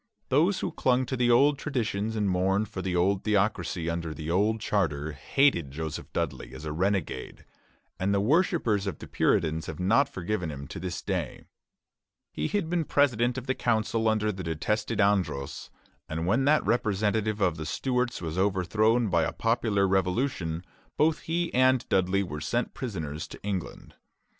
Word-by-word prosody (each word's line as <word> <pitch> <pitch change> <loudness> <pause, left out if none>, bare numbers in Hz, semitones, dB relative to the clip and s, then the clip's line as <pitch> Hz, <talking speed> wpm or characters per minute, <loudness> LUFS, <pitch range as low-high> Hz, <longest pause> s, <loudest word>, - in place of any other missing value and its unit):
Those 170 +8 +3
who - - -2
clung 130 0 +1
to 130 - -3
the 120 -1 +2
old 140 +4 +5
traditions 110 -6 -2
and 105 -2 0
mourned 95 +3 +1
for 95 - -5
the 95 -1 -2
old 95 +2 +2
theocracy 95 -5 0
under 85 -2 -3
the 80 +2 -4
old 105 +5 +2
charter, 80 -9 -1
hated 85 - +2
Joseph 80 +2 -6
Dudley 70 -6 -3
as 75 - -8
a 75 - -3
renegade; 90 -5 -2 0.5
and 95 +2 +1
the 100 - +2
worshippers 120 - +2
of 100 - -3
the - - -9
Puritans 80 -1 +1
have 80 - -6
not 115 +10 +3
forgiven 90 - -3
him 70 -2 -6
to - - -6
this 90 0 -5
day. - - -3 0.9
He - - -1
had 205 -5 -1
been 170 0 0
president 125 -4 +2
of 130 - -5
the 130 - +1
council 115 -2 0
under 110 -1 +2
the 95 -2 -7
detested 95 +7 -2
Andros, 95 -9 0 0.4
and 80 +1 -2
when 115 +9 +2
that 150 +1 +3
representative 110 -1 +1
of 90 -5 +1
the 80 - -5
Stuarts 125 - -1
was 80 +2 -3
overthrown 105 +5 +2
by 85 -2 +3
a - - 0
popular 110 -4 +1
revolution, 90 -3 0 0.3
both 155 +1 +3
he 170 +1 -2
and 130 0 +3
Dudley 95 +1 +2
were 75 -5 -6
sent 120 +10 -1
prisoners 80 - -5
to - - -12
England. 95 -3 -5
100 Hz, 170 wpm, -28 LUFS, 85-120 Hz, 0.9 s, old